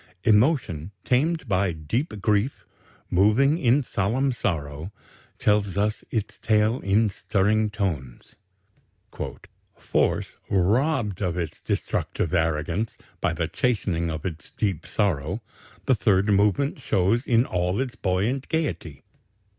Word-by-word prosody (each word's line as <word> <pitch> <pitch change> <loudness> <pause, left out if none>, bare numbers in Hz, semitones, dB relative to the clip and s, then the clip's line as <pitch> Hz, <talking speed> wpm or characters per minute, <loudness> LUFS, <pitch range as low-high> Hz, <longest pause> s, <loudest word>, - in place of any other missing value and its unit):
Emotion 105 - +2 0.2
tamed 160 +6 +1
by 95 -1 +2
deep 100 - -3
grief, 105 +5 +1 0.5
moving 115 - +4
in 130 0 +3
solemn 125 +6 0
sorrow, 80 - -3 0.5
tells 100 -2 +1
us 105 +1 0
its 110 -4 -3
tale 110 +2 +2
in 105 +3 +2
stirring 105 +2 +1
tones. 80 - -4 1.4
"Force - - 0
robbed 105 - +1
of 90 -3 -1
its 85 -3 -4
destructive 85 - -2
arrogance 85 +5 0 0.2
by - - +1
the 80 0 -1
chastening 95 -6 0
of 80 -2 -5
its 80 -4 -5
deep 100 -7 -2
sorrow 90 -1 0 0.5
the 135 - +4
Third 100 -3 +2
Movement 105 +9 +2
shows 110 +2 +2
in 120 -1 +4
all 90 0 -1
its 130 -2 -2
buoyant 105 +7 -1
gaiety. 85 - -2
100 Hz, 115 wpm, -25 LUFS, 90-120 Hz, 1.4 s, moving